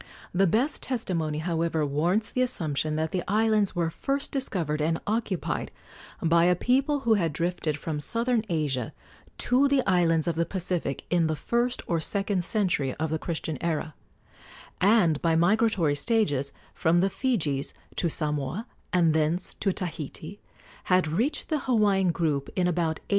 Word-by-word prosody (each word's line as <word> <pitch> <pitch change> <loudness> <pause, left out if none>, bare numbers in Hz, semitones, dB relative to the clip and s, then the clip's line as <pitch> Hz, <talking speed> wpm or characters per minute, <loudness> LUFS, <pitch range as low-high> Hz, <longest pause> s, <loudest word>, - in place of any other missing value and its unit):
The 190 +2 +3
best 240 - +1
testimony, 170 - -2
however, 165 -1 0
warrants 175 +9 0
the 255 - 0
assumption 155 - -1
that 160 0 -1
the 185 - -1
islands 215 -1 +2
were 170 -2 0
first 275 - -2
discovered 170 - -1
and 160 +2 0
occupied 215 -4 -2 0.5
by 170 +1 +4
a 180 0 +4
people 270 - +1
who 235 -4 +3
had 170 -7 +1
drifted 165 -1 -2
from 150 0 -4
southern 230 +7 0
Asia 145 -8 -1 0.4
to 260 +3 +3
the 275 -2 +2
islands 165 -4 +2
of 170 - +1
the 165 +1 +1
Pacific 180 -6 -3
in 170 -2 +3
the 155 - -1
first 240 +9 -1
or 170 -2 0
second 195 +2 +1
century 170 - 0
of 160 0 -2
the 160 - -1
Christian 160 -3 -4
era, 160 -2 -2 0.9
and, 185 -6 +4
by 165 -1 +2
migratory 185 -2 +3
stages 145 - +1 0.2
from 170 +2 +2
the 195 - +2
Fijis 155 - -1 0.2
to 170 - +1
Samoa 150 - -2 0.3
and 170 -4 +3
thence 160 +3 0
to 195 - +1
Tahiti, 165 0 -6 0.4
had 185 -3 +3
reached 230 - -1
the 310 -2 +1
Hawaiian 205 -7 +2
group 155 -5 -1
in 185 - +1
about 165 -3 0
A. - - -34
175 Hz, 160 wpm, -27 LUFS, 155-215 Hz, 0.9 s, by